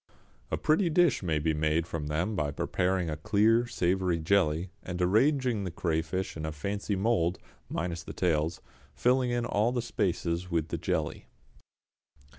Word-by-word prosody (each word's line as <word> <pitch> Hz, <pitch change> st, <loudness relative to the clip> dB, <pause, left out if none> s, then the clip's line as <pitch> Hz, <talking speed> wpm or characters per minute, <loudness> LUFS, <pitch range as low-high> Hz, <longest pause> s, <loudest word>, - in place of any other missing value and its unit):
A -, -, -1 dB
pretty 170 Hz, +4 st, +2 dB
dish 165 Hz, -4 st, +3 dB
may 80 Hz, -5 st, 0 dB
be 80 Hz, +1 st, +1 dB
made 80 Hz, +2 st, +1 dB
from 80 Hz, -3 st, -4 dB
them 85 Hz, +8 st, -1 dB
by 75 Hz, -5 st, 0 dB
preparing 90 Hz, +5 st, 0 dB
a 75 Hz, -, -2 dB
clear 110 Hz, +8 st, +3 dB
savoury 90 Hz, -4 st, +1 dB
jelly, 85 Hz, 0 st, +1 dB
and 90 Hz, -1 st, -5 dB
arranging 120 Hz, +4 st, +2 dB
the 95 Hz, -, -3 dB
crayfish 85 Hz, +2 st, -2 dB
in 80 Hz, -, -5 dB
a 80 Hz, -, -2 dB
fancy 100 Hz, +6 st, -3 dB
mould 95 Hz, -4 st, +1 dB, 0.3 s
minus 85 Hz, -1 st, -3 dB
the -, -, -8 dB
tails 80 Hz, -2 st, 0 dB, 0.3 s
filling 125 Hz, 0 st, +2 dB
in 120 Hz, 0 st, 0 dB
all 120 Hz, +3 st, +1 dB
spaces 90 Hz, -6 st, -1 dB
with 85 Hz, -2 st, -1 dB
the -, -, -2 dB
jelly. -, -, -2 dB
90 Hz, 155 wpm, -29 LUFS, 80-110 Hz, 0.3 s, dish